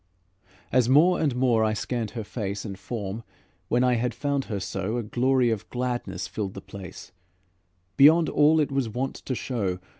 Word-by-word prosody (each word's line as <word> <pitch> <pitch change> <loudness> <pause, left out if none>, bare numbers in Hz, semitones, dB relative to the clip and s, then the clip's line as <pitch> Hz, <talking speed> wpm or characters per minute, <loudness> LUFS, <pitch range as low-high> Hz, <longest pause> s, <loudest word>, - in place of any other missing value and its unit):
As 125 -2 +3
more 160 +7 +5
and 145 -6 +1
more 125 -3 +3
I 110 0 +1
scanned 115 0 -3
her 110 - -2
face 105 -1 -4
And 95 -3 -6
form, 105 -1 -5 0.5
when 120 +1 +2
I 125 -1 +3
had 120 0 -1
found 140 -2 -1
her 105 -4 -3
so, 100 +4 -3
A 120 - -2
glory 125 +2 +2
of 110 -3 -4
gladness 120 -7 -3
filled 100 -3 -4
the - - -5
place 95 -1 -10 0.9
Beyond 160 +4 +7
all 155 +2 +4
it 150 -2 +1
was 135 -4 0
wont 125 +5 -3
to 130 - -4
show. 105 -8 -2
120 Hz, 180 wpm, -26 LUFS, 105-130 Hz, 0.9 s, Beyond